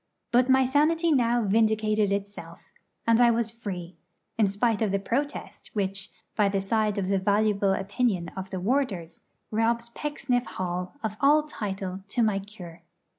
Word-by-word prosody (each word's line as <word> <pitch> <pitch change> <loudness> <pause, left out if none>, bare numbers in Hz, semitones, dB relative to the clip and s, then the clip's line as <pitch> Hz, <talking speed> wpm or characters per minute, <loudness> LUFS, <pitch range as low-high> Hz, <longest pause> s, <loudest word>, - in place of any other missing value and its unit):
But 250 +2 +4
my 265 0 +5
sanity 315 +5 +2
now 240 -4 +3
vindicated 215 0 +2
itself, 200 0 -5 0.3
and 230 +1 +4
I 240 - +7
was 230 -1 +1
free, 185 -6 -7 0.4
in 215 -3 +3
spite 205 +3 0
of 215 -3 +1
the 200 - +2
protest 275 +9 -3
which, 195 -1 -2 0.3
by 205 -2 +3
the 195 0 0
side 210 +1 0
of 195 -2 -1
the 195 0 +2
valuable 200 0 +2
opinion 195 -2 -1
of 190 0 -7
the 190 - -4
warders, 190 - -1 0.3
robs 230 +2 +1
Pecksniff 260 -2 -2
Hall 180 +2 -3
of 215 -1 -3
all 295 +2 +5
title 195 -9 -5
to 235 +3 0
my 210 -3 +2
'cure.' 180 -5 -11
215 Hz, 160 wpm, -27 LUFS, 195-240 Hz, 0.4 s, I